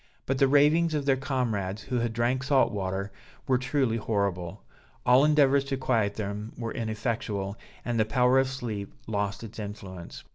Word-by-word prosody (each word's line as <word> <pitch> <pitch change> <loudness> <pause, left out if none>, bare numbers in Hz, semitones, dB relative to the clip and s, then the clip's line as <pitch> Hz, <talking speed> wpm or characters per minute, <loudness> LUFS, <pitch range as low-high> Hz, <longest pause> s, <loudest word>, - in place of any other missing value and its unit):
But 135 0 -1
the 135 - +5
ravings 150 +4 +4
of 145 -2 -1
their 135 -1 +4
comrades 110 -7 -2
who 125 +3 -2
had 115 -1 0
drank 120 +3 0
salt 140 -1 +3
water 100 0 -3 0.4
were 130 -2 +3
truly 125 -2 0
horrible; 100 - -2 0.4
all 125 +2 +6
endeavors 140 -2 +4
to 135 -1 -2
quiet 115 -6 +1
them 105 +1 -4
were 115 -2 -4
ineffectual, 110 -3 -2 0.3
and 120 -2 -1
the - - +5
power 125 +4 +3
of 135 - +2
sleep 115 -7 -5
lost 105 0 -2
its 115 0 -9
influence. 100 -4 -8
115 Hz, 170 wpm, -28 LUFS, 100-135 Hz, 0.4 s, all